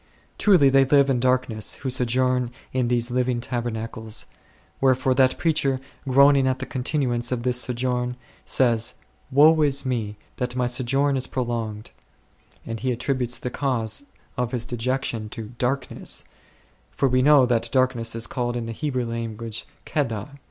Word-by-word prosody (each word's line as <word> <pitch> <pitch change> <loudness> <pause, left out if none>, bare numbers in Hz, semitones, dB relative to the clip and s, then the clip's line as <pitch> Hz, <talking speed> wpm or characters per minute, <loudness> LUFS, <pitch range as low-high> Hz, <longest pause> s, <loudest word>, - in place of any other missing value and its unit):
Truly, 180 -10 +5
they 135 0 +5
live 140 0 +4
in 125 - +1
dark 130 +1 +2
ness 110 -2 -2
who 135 -2 -4
sojourn 125 0 +1 0.2
in 130 -2 +1
these 120 0 0
living 125 -1 0
tabernacles; 115 -2 -4 0.6
wherefore 130 0 +3
that 130 0 +3
preacher, 145 -5 +1 0.3
groaning 140 0 +5
at 130 0 +1
the 130 - -5
con 130 - -4
tinuance 125 -4 0
of 120 -2 -2
this 125 0 +1
sojourn, 125 0 -1 0.3
says, 120 -3 +1 0.2
" - - -35
Woe 155 +4 +6
is 140 -2 +2
me 110 -5 -2 0.2
that 125 0 -2
my 125 -1 +1
sojourn 135 +3 +1
is 130 - 0
prolonged 115 -4 -3 0.7
V' - - -6
and 115 - -4
he 130 +2 -1
attributes 125 0 -1
the 125 - -5
cause 120 -2 -1 0.3
of 125 0 -2
his 120 -2 -2
dejection 120 -2 -2
to 110 -1 -7
"darkness"; 130 +1 -1 0.7
for 135 - 0
\^e 130 0 +2
know 145 -2 +6
that 120 -2 0
darkness 125 -3 +1
is 115 0 -1
called 120 -2 -2
in 120 - -3
the 115 - -5
Hebrew 130 0 -2
language 115 -1 -5 0.2
"kedar." 115 -6 -2
125 Hz, 165 wpm, -24 LUFS, 120-130 Hz, 0.7 s, Woe